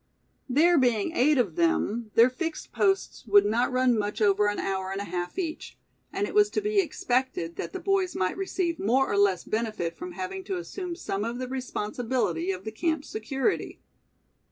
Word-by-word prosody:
There 325 Hz, +5 st, +5 dB
being 240 Hz, -1 st, +2 dB
eight 295 Hz, +2 st, +4 dB
of 245 Hz, -, +1 dB
them, 240 Hz, -10 st, +1 dB
their 235 Hz, +2 st, +6 dB
fixed 325 Hz, +4 st, -5 dB
posts 390 Hz, -1 st, 0 dB
would 205 Hz, 0 st, +6 dB
not 230 Hz, +5 st, +1 dB
run 255 Hz, -1 st, +3 dB
much 205 Hz, -1 st, -2 dB
over 205 Hz, -1 st, +3 dB
an 205 Hz, -, -1 dB
hour 190 Hz, -1 st, -2 dB
and 195 Hz, -, -3 dB
a -, -, -3 dB
half 175 Hz, -, -4 dB
each; 335 Hz, -4 st, -4 dB, 0.3 s
and 395 Hz, +1 st, -1 dB
it -, -, -6 dB
was 415 Hz, 0 st, +5 dB
to -, -, -1 dB
be 420 Hz, 0 st, +1 dB
expected 255 Hz, -, -1 dB
that 170 Hz, -, -4 dB
the -, -, -5 dB
boys 390 Hz, -2 st, 0 dB
might 185 Hz, 0 st, 0 dB
receive 370 Hz, -3 st, -2 dB
more 255 Hz, +6 st, +2 dB
or -, -, +1 dB
less 200 Hz, -3 st, +3 dB
benefit 215 Hz, -7 st, -2 dB
from 180 Hz, +1 st, -7 dB
having 190 Hz, -, -5 dB
to 380 Hz, -1 st, -2 dB
assume 355 Hz, 0 st, -5 dB
some 205 Hz, -, -3 dB
of 235 Hz, +2 st, -3 dB
the 255 Hz, 0 st, -4 dB
responsibility 240 Hz, -7 st, -2 dB
of 185 Hz, 0 st, -5 dB
the 220 Hz, -, -5 dB
camp's 315 Hz, +5 st, -2 dB
security. 265 Hz, -, -2 dB
245 Hz, 190 wpm, -27 LUFS, 205-335 Hz, 0.3 s, their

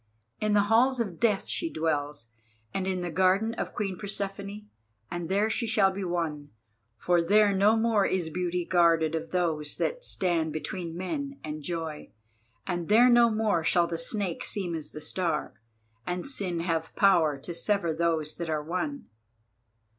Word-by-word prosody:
In 215 Hz, 0 st, +1 dB
the 205 Hz, -, +5 dB
halls 240 Hz, +5 st, +3 dB
of 200 Hz, -8 st, -3 dB
Death 215 Hz, -4 st, +2 dB
she 330 Hz, -1 st, -2 dB
dwells, 145 Hz, -6 st, -2 dB, 0.4 s
and 190 Hz, -1 st, -2 dB
in 185 Hz, -1 st, -1 dB
the 175 Hz, -, -3 dB
garden 190 Hz, +6 st, +2 dB
of -, -, -5 dB
Queen 195 Hz, -3 st, -3 dB
Persephone, 200 Hz, 0 st, -4 dB, 0.4 s
and 175 Hz, -1 st, -4 dB
there 200 Hz, +3 st, +2 dB
she 230 Hz, +1 st, -1 dB
shall 210 Hz, -3 st, +3 dB
be 195 Hz, +1 st, -5 dB
won, 165 Hz, -5 st, -2 dB, 0.5 s
for 175 Hz, +8 st, +2 dB
there 205 Hz, +4 st, +4 dB
no 200 Hz, +3 st, +4 dB
more 220 Hz, -2 st, +3 dB
is 180 Hz, -4 st, -1 dB
beauty 180 Hz, 0 st, -2 dB
guarded 165 Hz, -3 st, +3 dB
of 165 Hz, 0 st, -3 dB
Those 160 Hz, -5 st, 0 dB
that -, -, -2 dB
stand 170 Hz, -, 0 dB
between 170 Hz, +1 st, -5 dB
men 280 Hz, -, -4 dB
and 155 Hz, 0 st, -5 dB
joy, 160 Hz, -1 st, -5 dB, 0.5 s
and 175 Hz, -2 st, -3 dB
there 240 Hz, +4 st, +6 dB
no 240 Hz, -1 st, +6 dB
more 215 Hz, -6 st, +1 dB
shall 170 Hz, +1 st, +3 dB
the 170 Hz, -1 st, -4 dB
Snake 185 Hz, 0 st, -3 dB
seem 185 Hz, -4 st, -3 dB
as 155 Hz, -2 st, -5 dB
the 155 Hz, -, -8 dB
Star, 165 Hz, 0 st, -2 dB, 0.5 s
and 180 Hz, 0 st, -2 dB
Sin 190 Hz, -11 st, -2 dB
have 165 Hz, -1 st, -2 dB
power 170 Hz, -8 st, +4 dB
to 170 Hz, +6 st, -7 dB
sever 170 Hz, -2 st, 0 dB
those 160 Hz, -2 st, 0 dB
that 170 Hz, -2 st, -4 dB
are 155 Hz, -1 st, -1 dB
one. 225 Hz, -, -3 dB
180 Hz, 170 wpm, -28 LUFS, 165-210 Hz, 0.5 s, there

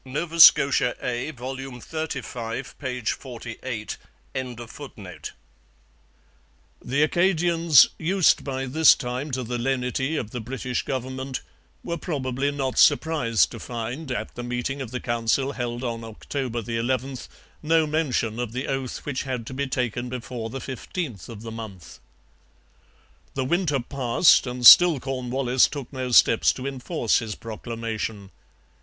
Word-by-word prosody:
Nova 160 Hz, +5 st, -4 dB
Scotia 140 Hz, -6 st, +7 dB
A, 125 Hz, +3 st, -3 dB
vol. 130 Hz, -2 st, -6 dB
xxxv, 130 Hz, -2 st, -5 dB
p. 125 Hz, -2 st, -4 dB
48.] 115 Hz, -1 st, -5 dB, 2.9 s
The 140 Hz, +4 st, +1 dB
Acadians, 170 Hz, -2 st, +4 dB
used 185 Hz, +2 st, +3 dB
by 135 Hz, -1 st, -3 dB
this 155 Hz, +4 st, +6 dB
time 125 Hz, +4 st, -4 dB
to 130 Hz, -1 st, -2 dB
the 120 Hz, +1 st, -3 dB
lenity 130 Hz, +3 st, -1 dB
of 110 Hz, -6 st, -4 dB
the 125 Hz, -, -4 dB
British 125 Hz, +1 st, -3 dB
government, 130 Hz, 0 st, -4 dB, 0.4 s
were 170 Hz, -1 st, -4 dB
probably 140 Hz, -4 st, -2 dB
not 135 Hz, -2 st, -2 dB
surprised 130 Hz, -9 st, +3 dB
to -, -, -8 dB
find, 120 Hz, +5 st, -5 dB
at 125 Hz, -, -4 dB
the 120 Hz, -, -6 dB
meeting 125 Hz, +3 st, -3 dB
of 130 Hz, -, -5 dB
the 125 Hz, +1 st, -4 dB
Council 120 Hz, +3 st, 0 dB
held 120 Hz, -1 st, -4 dB
on 115 Hz, -2 st, -3 dB
October 120 Hz, +2 st, -4 dB
11, 125 Hz, +3 st, -1 dB, 0.4 s
no 160 Hz, +1 st, +3 dB
mention 135 Hz, -7 st, -1 dB
of 120 Hz, -2 st, -3 dB
the 130 Hz, +2 st, -3 dB
oath 135 Hz, -2 st, -4 dB
which 145 Hz, -3 st, -2 dB
had 125 Hz, -4 st, -4 dB
to 130 Hz, -, -7 dB
be 140 Hz, +2 st, -2 dB
taken 125 Hz, -2 st, -2 dB
before 120 Hz, -2 st, -5 dB
the 135 Hz, -, -6 dB
15th 130 Hz, -, -6 dB
of 110 Hz, -2 st, -9 dB
the 115 Hz, -, -6 dB
month. 110 Hz, -6 st, -9 dB, 1.4 s
The 135 Hz, -1 st, -1 dB
winter 165 Hz, -2 st, +1 dB
passed, 130 Hz, +3 st, +3 dB
and 125 Hz, 0 st, -3 dB
still 175 Hz, +1 st, +10 dB
Cornwallis 130 Hz, -1 st, +1 dB
took 140 Hz, -2 st, -8 dB
no 130 Hz, -1 st, -3 dB
steps 115 Hz, -1 st, +5 dB
to 130 Hz, -, -7 dB
enforce 135 Hz, -2 st, 0 dB
his 110 Hz, -2 st, -5 dB
proclamation. 110 Hz, -3 st, -5 dB
130 Hz, 135 wpm, -24 LUFS, 120-140 Hz, 2.9 s, still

